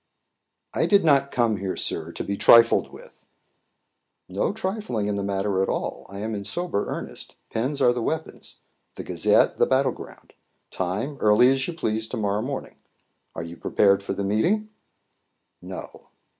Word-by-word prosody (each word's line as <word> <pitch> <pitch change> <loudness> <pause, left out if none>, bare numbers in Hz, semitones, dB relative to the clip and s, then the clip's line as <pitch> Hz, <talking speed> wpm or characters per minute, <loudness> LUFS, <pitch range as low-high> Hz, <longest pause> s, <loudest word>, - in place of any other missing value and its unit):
"I - - +1
did 200 -4 +4
not 140 -3 +4
come 115 -5 +1
here, 95 -1 -3
sir, 80 0 -3
to - - -5
be 100 - -3
trifled 115 +3 +6
with." - - -15 1.0
"No 95 - -1
trifling 190 - -3
in 105 - 0
the 100 - -2
matter 100 0 -1
at 95 - 0
all; - - -3
I 100 +1 -7
am 110 +1 -3
in 100 -1 -4
sober 110 - -2
earnest. - - -7 0.2
Pens 130 +6 -1
are 120 - +5
the 120 - -3
weapons; 160 - -4 0.4
the - - -6
Gazette, - - +2
the - - +3
battle 135 +1 +2
ground; - - -12 0.4
time, 100 +11 -3
early 110 +5 +5
as 135 0 0
you 175 - -5
please 110 -7 -2
to 120 - -5
morrow 105 -1 0
morning. 135 +3 -5 0.6
Are 80 - -4
you 85 +1 -8
prepared 100 +3 +2
for 100 - -4
the 100 - -3
meeting?" 175 - +1 0.9
"No." - - -9
110 Hz, 170 wpm, -24 LUFS, 100-140 Hz, 1.0 s, trifled